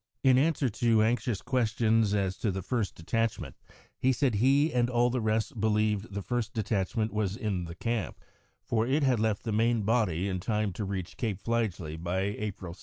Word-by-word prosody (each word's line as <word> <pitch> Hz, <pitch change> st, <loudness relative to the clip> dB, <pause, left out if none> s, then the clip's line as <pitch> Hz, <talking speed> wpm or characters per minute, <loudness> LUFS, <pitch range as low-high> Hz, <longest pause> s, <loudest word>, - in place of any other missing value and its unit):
In 130 Hz, -2 st, +6 dB
answer 145 Hz, -2 st, +2 dB
to 115 Hz, -1 st, +2 dB
anxious 115 Hz, -2 st, 0 dB
questions 115 Hz, -4 st, +2 dB
as 95 Hz, -2 st, 0 dB
to 110 Hz, -, -1 dB
the 95 Hz, -1 st, -3 dB
first 115 Hz, -3 st, -2 dB
detachment, 115 Hz, +7 st, -2 dB, 0.4 s
he 130 Hz, -, +3 dB
said 130 Hz, -1 st, +1 dB
he 135 Hz, +8 st, +3 dB
and 120 Hz, -1 st, +2 dB
all 120 Hz, 0 st, +2 dB
the 125 Hz, 0 st, -1 dB
rest 110 Hz, +3 st, -1 dB
believed 105 Hz, -1 st, +1 dB
the 100 Hz, 0 st, -4 dB
first 115 Hz, +3 st, -2 dB
detachment 110 Hz, 0 st, -1 dB
was 105 Hz, -2 st, -1 dB
in 100 Hz, -6 st, -2 dB
the 85 Hz, 0 st, -8 dB
camp, 115 Hz, +1 st, -3 dB, 0.5 s
for 115 Hz, 0 st, 0 dB
it 140 Hz, +3 st, +2 dB
had 130 Hz, -4 st, +3 dB
left 110 Hz, -2 st, 0 dB
the 115 Hz, -, -2 dB
main 115 Hz, +1 st, +2 dB
body 100 Hz, -5 st, +1 dB
in 95 Hz, -2 st, -2 dB
time 105 Hz, 0 st, -1 dB
to 105 Hz, -, -4 dB
reach 95 Hz, -2 st, -5 dB
Cape 110 Hz, -6 st, -2 dB
Fligely 95 Hz, -8 st, -2 dB
by 90 Hz, +2 st, -1 dB
April 100 Hz, -3 st, -4 dB
2. 90 Hz, -, -17 dB
110 Hz, 190 wpm, -29 LUFS, 100-120 Hz, 0.5 s, In